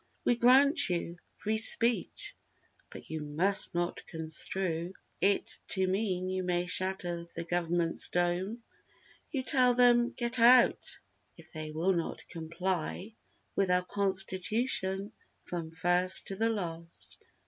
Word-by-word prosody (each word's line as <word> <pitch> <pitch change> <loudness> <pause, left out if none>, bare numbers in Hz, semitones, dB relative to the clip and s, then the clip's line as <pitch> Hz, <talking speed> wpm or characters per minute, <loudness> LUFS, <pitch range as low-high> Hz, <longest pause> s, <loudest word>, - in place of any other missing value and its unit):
"We 240 - +3
grant 265 - +4
you 170 -1 -3 0.2
'Free 215 +1 -2
Speech!' 230 -2 +3 0.5
but - - -12
you 160 - -4
must 170 +7 +3
not 175 0 -3
construe 165 +2 -2 0.3
It 200 +1 0
to 190 -1 +1
mean 185 -1 -2
you 185 0 -2
may 180 -1 -1
shatter 180 -2 -1
the 170 - -4
government's 170 -1 -1
dome!" 180 +6 -2 0.7
You 270 -4 -3
tell 250 -2 +4
them 240 -1 +4
"Get 240 -1 -1
out!"—if 235 -8 +2
they 155 0 -6
will 165 +5 0
not 170 -2 -5
comply 175 +4 -4 0.4
With 195 -2 0
our 180 0 +2
Constitution 195 +1 -2 0.3
from 170 -2 -6
first 175 +3 +2
to 195 - -5
the 225 +3 0
last. 170 -6 -4
185 Hz, 125 wpm, -30 LUFS, 170-220 Hz, 0.7 s, grant